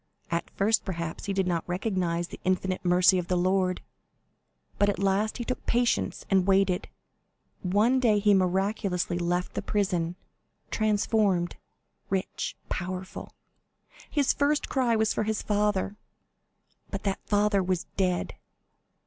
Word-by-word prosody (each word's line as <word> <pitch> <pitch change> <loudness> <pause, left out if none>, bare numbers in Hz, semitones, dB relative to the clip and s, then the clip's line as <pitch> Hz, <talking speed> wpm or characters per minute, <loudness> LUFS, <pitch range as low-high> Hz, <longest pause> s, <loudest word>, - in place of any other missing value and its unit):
At 170 0 -1
first, 215 +3 +2
perhaps, 170 -4 -4
he 200 - -2
did 190 -1 +1
not 175 -2 0
recognize 180 -3 -1
the - - -9
infinite 185 0 0
mercy 180 +1 +5
of 175 - -4
the 180 - +1
Lord, 185 0 +1 1.0
but 205 - +4
at 200 - -1
last 200 +3 +1
he 240 - -4
took 255 - -3
patience 240 0 +1
and 190 -1 +2
waited. 195 -2 +2 0.7
One 210 +8 +3
day 225 -5 +3
he 205 0 +4
miraculously 190 -1 0
left 175 +1 -1
the - - -2
prison, 180 -5 -1 0.6
transformed, 205 -4 +1 0.5
rich, 190 -1 -2
powerful. 185 +1 -5 0.7
His 285 -4 +2
first 295 +1 +1
cry 250 -4 +2
was 220 -1 +2
for - - -1
his 215 0 -1
father; 210 -1 0 0.9
but 195 - -5
that 195 -1 -1
father 205 -1 +3
was 185 0 -1
dead." 185 -2 0
195 Hz, 135 wpm, -27 LUFS, 180-210 Hz, 1.0 s, mercy